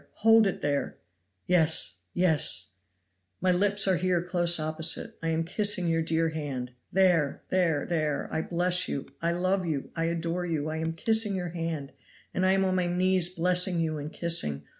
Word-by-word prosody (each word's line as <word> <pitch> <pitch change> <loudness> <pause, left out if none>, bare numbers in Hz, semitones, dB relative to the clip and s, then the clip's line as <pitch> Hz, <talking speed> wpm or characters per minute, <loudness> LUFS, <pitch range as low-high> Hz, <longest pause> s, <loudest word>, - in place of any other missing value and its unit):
"Hold 225 -1 +6
it 195 - -3
there!" 145 -1 -2 0.5
"Yes! 165 -3 +2 0.2
yes!" 160 - +1 0.7
"My 185 +1 +2
lips 200 +2 +3
are 190 -2 +3
here 180 0 +1
close 175 -1 +2
opposite 155 +1 0
it. - - -33
I 165 - -3
am 165 0 0
kissing 190 +1 0
your 165 0 +1
dear 165 0 +1
hand. 140 -6 -5 0.2
There! 175 -6 +2
there! 170 -6 +1
there! 155 -4 -1
I 160 - 0
bless 180 +2 +1
you! 140 - -4 0.2
I 170 +1 +1
love 185 +2 0
you! 155 -5 -3
I 165 -1 -1
adore 170 +1 -2
you! 155 -2 -2
I 155 - -4
am 160 0 -2
kissing 220 +3 +2
your 180 -2 -3
hand, 165 -4 -4 0.4
and 185 +1 +1
I 190 - +4
am 195 0 +2
on 185 - 0
my 180 -1 0
knees 180 0 +2
blessing 180 0 +1
you 155 -2 -1
and 145 +2 -6
kissing. 75 - 0
170 Hz, 185 wpm, -27 LUFS, 160-185 Hz, 0.7 s, Hold